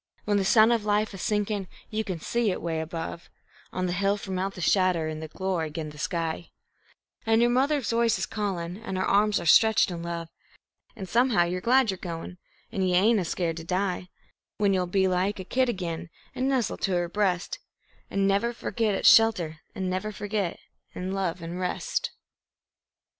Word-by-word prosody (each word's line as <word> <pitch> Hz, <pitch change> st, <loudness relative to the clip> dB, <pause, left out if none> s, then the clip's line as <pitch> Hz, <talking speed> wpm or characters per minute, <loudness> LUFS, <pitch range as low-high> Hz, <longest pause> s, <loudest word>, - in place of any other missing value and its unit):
When 205 Hz, -1 st, +2 dB
the 195 Hz, -, +2 dB
sun 220 Hz, +3 st, +6 dB
of 230 Hz, -3 st, +1 dB
life's 210 Hz, 0 st, +1 dB
a -, -, -7 dB
sinkin' 210 Hz, -1 st, -1 dB, 0.2 s
you 220 Hz, 0 st, -1 dB
can 185 Hz, -5 st, -4 dB
see 235 Hz, +6 st, 0 dB
it 185 Hz, -, -2 dB
'way 165 Hz, -1 st, -2 dB
above, 165 Hz, +1 st, -6 dB, 0.4 s
On 185 Hz, 0 st, -2 dB
the 180 Hz, -, -1 dB
hill 200 Hz, +2 st, +1 dB
from 190 Hz, -2 st, -4 dB
out 195 Hz, +1 st, -2 dB
the -, -, -8 dB
shadder 180 Hz, -2 st, +2 dB
in 155 Hz, 0 st, -5 dB
a 160 Hz, -, -5 dB
glory 180 Hz, -1 st, -2 dB
'gin 155 Hz, 0 st, -5 dB
the 150 Hz, -, -13 dB
sky, 165 Hz, 0 st, -2 dB, 0.7 s
An' 225 Hz, 0 st, +3 dB
your 240 Hz, +1 st, +4 dB
mother's 270 Hz, 0 st, +1 dB
voice 230 Hz, -1 st, +2 dB
is -, -, -1 dB
callin', 185 Hz, -4 st, -3 dB
an' 225 Hz, -3 st, -6 dB
her 185 Hz, -, 0 dB
arms 205 Hz, +1 st, +3 dB
are -, -, -6 dB
stretched 220 Hz, +3 st, +5 dB
in 170 Hz, -1 st, -5 dB
love, 170 Hz, -1 st, -5 dB, 0.7 s
An' 195 Hz, -, -6 dB
somehow 230 Hz, -1 st, +3 dB
you're 180 Hz, +1 st, -2 dB
glad 255 Hz, -1 st, +4 dB
you're 190 Hz, -, -6 dB
goin', 175 Hz, 0 st, -6 dB, 0.3 s
an' 195 Hz, -, -2 dB
you 185 Hz, -1 st, +2 dB
ain't 215 Hz, +4 st, +4 dB
a 180 Hz, -, -1 dB
scared 165 Hz, -1 st, -2 dB
to 165 Hz, -, -6 dB
die; 180 Hz, +1 st, -2 dB, 0.5 s
When 205 Hz, -2 st, +2 dB
you'll 180 Hz, -1 st, +1 dB
be 190 Hz, +1 st, +2 dB
like 185 Hz, +2 st, 0 dB
a -, -, -4 dB
kid 255 Hz, +6 st, +1 dB
again 170 Hz, -5 st, -4 dB, 0.2 s
an' 260 Hz, -, -1 dB
nestle 260 Hz, -5 st, 0 dB
to 195 Hz, -, -1 dB
her 175 Hz, -1 st, +1 dB
breast, 195 Hz, -, -1 dB, 0.5 s
An' 200 Hz, 0 st, +1 dB
never 200 Hz, +4 st, +2 dB
leave 235 Hz, -, -5 dB
its 210 Hz, -3 st, +2 dB
shelter, 180 Hz, -9 st, +3 dB, 0.2 s
an' 185 Hz, +3 st, -2 dB
forget, 205 Hz, -3 st, -2 dB, 0.4 s
an' 185 Hz, +1 st, -4 dB
love, 185 Hz, -3 st, -2 dB
an' 170 Hz, +2 st, -5 dB
rest. 180 Hz, -1 st, -2 dB
190 Hz, 195 wpm, -27 LUFS, 175-210 Hz, 0.7 s, sun